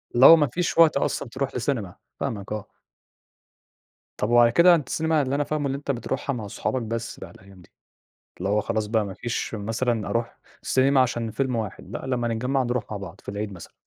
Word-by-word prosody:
اللي 125 +2 +7
هو 165 - +12
ما 150 -3 +2
فيش 175 +7 -2
وقت 165 -3 +6
أصلًا 140 - -1
تروح 135 +3 -3
لسينما، 120 -7 -2 0.2
فاهمك 100 -3 -4
آه. 105 -2 -3 1.5
طب 105 - -1
وعلى 120 0 +6
كده 170 +7 +7
أنت 150 -6 -3
السينما 160 -1 +1
اللي 135 0 -1
أنا 145 - +1
فاهمُه 150 0 -2
اللي 135 0 -2
أنت 140 0 -3
بتروحها 135 +2 -3
مع 110 -5 -5
صحابك 130 +5 -2
بس 115 0 -4
بقى 90 - -9
الأيام 95 0 -16
دي، - - -21 0.7
اللي 95 - -2
هو 105 +1 +2
خلاص 110 0 -2
بقى 110 0 +1
ما 100 -2 -6
فيش 120 +1 -3
مثلًا 110 +1 -1
أروح 115 +3 -2 0.2
سينما 135 +1 +3
عشان 120 -3 0
فيلم 130 +2 -1
واحد، 110 -3 -5
لأ - - -6
لمَّا 125 -2 -1
نتجمَّع 125 +4 0
نروح 120 -1 -1
مع 105 - -3
بعض 95 -1 -9
في - - -24
العيد 100 0 -4
مثلًا. 90 -3 -11
120 Hz, 210 wpm, -25 LUFS, 105-135 Hz, 1.5 s, هو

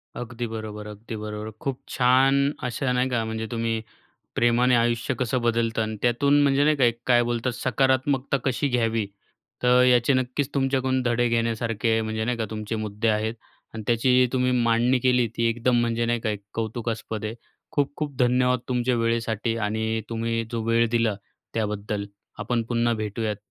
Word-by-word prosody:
अगदी 120 0 -5
बरोबर, 110 -1 -6
अगदी 105 +2 -8
बरोबर. 105 0 -5
खूप 135 -2 -3
छान 130 +2 +4 0.3
अशा 125 +1 -1
नाही 125 +1 +1
का, 120 -2 0
म्हणजे 110 0 -4
तुम्ही 115 -1 -2 0.5
प्रेमाने 120 +1 +3
आयुष्य 120 +2 +1
कसं 125 +1 0
बदलतं 115 -1 +1
आणि 110 0 -3
त्यातून 140 +4 +3
म्हणजे 140 0 +3
नाही 155 0 +3
का, 135 - +3 0.2
काय 120 -1 +5
बोलतात, 120 +1 -1
सकारात्मकता 130 +2 +1
कशी 135 +2 0
घ्यावी, 115 -4 0 0.6
तर 125 0 +5
याचे 125 +1 +4
नक्कीच 130 +2 -1
तुमच्याकडून 130 -1 +1
धडे 120 0 +1
घेण्यासारखे, 115 -1 0
म्हणजे 110 0 -2
नाही 125 0 -1
का 115 - 0
तुमचे 110 0 -4
मुद्दे 110 +1 -2
आहेत. 110 +1 0 0.4
आणि 110 - -5
त्याची 125 +2 +4
तुम्ही 125 -1 +2
मांडणी 120 +2 +3
केली, 125 -1 +3
ती 115 +1 -1
एकदम 120 +1 +2
म्हणजे 120 0 0
नाही 120 0 0
का 110 - -1
एक 105 -1 -4
कौतुकास्पद 115 -1 -3
आहे. 110 +2 -3 0.4
खूप-खूप 145 0 -2
धन्यवाद 125 0 +3
तुमच्या 125 0 +1
वेळेसाठी 115 0 0
आणि 110 +1 -1
तुम्ही 115 0 -1
जो 115 -2 -2
वेळ 115 0 +3
दिला 115 -2 +2 0.4
त्याबद्दल. 105 -1 -2 0.3
आपण 120 -2 -1
पुन्हा 120 0 +1
भेटूयात. 105 0 -3
115 Hz, 160 wpm, -25 LUFS, 110-125 Hz, 0.6 s, काय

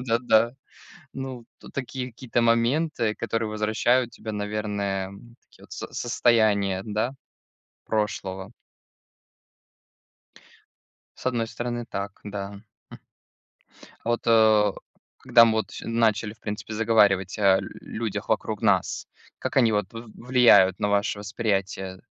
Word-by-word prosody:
Да-да-да. 115 -1 +2 0.6
Ну. 130 -3 -6
Тут - - -14
такие 130 -1 -4
какие-то 120 0 -2
моменты, 115 0 +1
которые 115 -1 -2
возвращают 110 +3 +1
тебя, 110 - -7
наверное, 105 -2 -3 0.4
такие - - -20
вот - - -18
с - - -6
состояния, 100 -5 +2
да, 110 +4 -1 0.7
прошлого. 100 -3 -3 2.6
С - - -10
одной 120 -3 0
стороны 120 0 -4
так, 100 0 -4
да. 100 -1 -6 0.3
Хм. - - -10 1.0
А - - -7
вот, 120 - 0
э, 110 -3 +5 0.5
когда 115 -1 +6
мы 115 - +3
вот 110 - -1
всё - - -8
начали, 110 -2 +1
в - - -22
принципе, 105 +1 -5
заговаривать 105 -4 +3
о 95 -2 +5
людях 110 -2 -6
вокруг 110 0 -1
нас, 100 -4 +1 0.3
как - - -4
они 115 -4 +5
вот 105 -1 -1
в 115 -1 -9
влияют 120 -7 +5
на 105 - +1
ваше 100 0 +1
восприятие 100 -3 -3
110 Hz, 120 wpm, -25 LUFS, 100-115 Hz, 2.6 s, когда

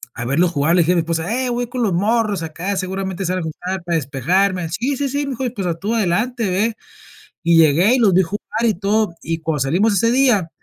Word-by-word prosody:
a 125 - -5
verlos 165 +7 +2
jugar, 160 +1 +1
le 180 - +5
dije 170 +2 +2
a - - 0
mi - - +3
esposa: 165 +3 -2
"Ey, 255 +1 -1
voy 245 0 -2
con 245 +1 -3
los 200 -5 +1
morros 210 +1 +1
acá, 165 +5 -4
seguramente 190 0 -3
salga 185 +1 -1
algún 160 -3 -4
plan 185 +1 -3
para 170 -1 -1
despejarme". 170 +6 0
"Sí, 250 - -2
sí, 285 - -1
sí", 285 +2 -2
me 275 - -4
dijo, 260 0 -3
y, 245 - -2
pues, 195 -6 -4
ah, 170 - -1
"tú 210 +5 -2
adelante, 225 +3 0
ve". 210 +5 0 0.7
Y 170 -1 +4
llegué 165 - +5
y - - +1
los 210 -5 +4
vi 190 +2 +4
jugar 200 +5 -4 0.3
y 220 - +3
todo, 205 0 0
y 165 0 -3
cuando 160 -2 -2
salimos 180 - +2
ese 230 +4 +2
día, 240 -9 +2
190 Hz, 250 wpm, -19 LUFS, 170-225 Hz, 0.7 s, le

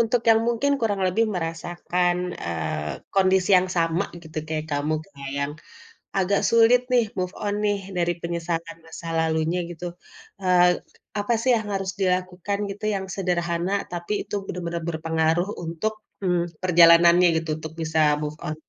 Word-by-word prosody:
untuk 230 +1 +2
yang 225 0 +6
mungkin 275 +5 +1
kurang 205 -3 0
lebih 220 +5 +2
merasakan, 175 +1 -1 0.3
eee, 80 -2 -3
kondisi 190 0 +3
yang 185 +1 +2
sama 165 +3 +1 0.2
gitu 160 -1 -14
kayak 155 -1 -2
kamu 145 +2 0 0.5
yang, 140 +1 -1 0.7
agak 195 +1 +2
sulit 230 +2 +6
nih 240 -2 +5
move 180 +1 -2
on 205 0 0
nih 205 -1 +2 0.2
dari 175 0 +1
penyesalan 170 -1 -3
masa 165 +1 -9
lalunya 160 +2 +1
gitu, 175 0 -8 0.6
eee, 180 -1 +5 0.5
apa 205 +4 0
sih 255 - +1
yang 220 -2 -3
harus 195 -1 -2
dilakukan 185 +1 -1
gitu 205 +2 -7
yang 190 -1 -3
sederhana 175 -1 -1 0.2
tapi 175 +3 -4
itu - - -8
benar-benar 170 -1 -4
berpengaruh 160 +2 0 0.2
untuk, 170 +7 -2 0.3
mmm, 180 -2 +2 0.2
perjalanannya 170 0 +7
gitu 160 0 -2
untuk 155 0 -7
bisa 160 0 0 0.2
move 150 +1 -4
on? 155 - -2
175 Hz, 150 wpm, -24 LUFS, 165-195 Hz, 0.7 s, perjalanannya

